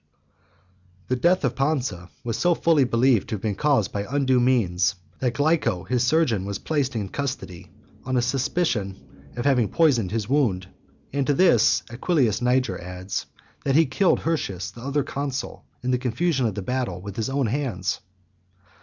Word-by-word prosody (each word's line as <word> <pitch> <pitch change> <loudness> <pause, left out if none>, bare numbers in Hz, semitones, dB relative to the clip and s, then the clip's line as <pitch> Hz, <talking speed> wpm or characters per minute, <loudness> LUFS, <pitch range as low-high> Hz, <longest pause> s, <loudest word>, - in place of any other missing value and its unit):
The 130 - +2
death 175 +5 +2
of 125 -3 -1
Pansa 130 - -1
was 115 -2 -2
so 175 +5 +2
fully 160 -5 +3
believed 120 -2 +2
to - - -1
have 100 - -7
been 110 -2 0
caused 135 -4 +1
by 100 - -2
undue 130 -2 +2
means, 100 -7 +2 0.2
that 125 -2 -1
Glyco, 145 - +1
his 125 -1 +1
surgeon, 125 - +2
was 100 0 -3
placed 140 -2 -1
in 105 -3 -2
custody, 130 -8 -5 0.3
on 130 -1 -1
a - - +3
suspicion 125 - 0 0.4
of 120 - -3
having 125 -6 +3
poisoned 135 - +2
his 110 0 -2
wound. 115 -10 +1 0.5
And 140 -1 0
to 145 - +3
this, 135 - +4
Aquilius 125 - +1
Niger 125 -6 +1
adds, 90 +2 -5 0.4
that 135 -1 +1
he 160 +1 +6
killed 180 +7 +2
Hirtius, 95 - -2
the 115 - -12
other 140 +3 0
consul, 140 -1 -4 0.2
in 125 - 0
the 125 - +1
confusion 130 +2 0
of 105 - -4
the 100 - -4
battle, 125 -6 -2
with 100 +1 -8
his 115 +2 -2
own 135 0 0
hands. 115 -7 -2
125 Hz, 170 wpm, -24 LUFS, 105-140 Hz, 0.5 s, he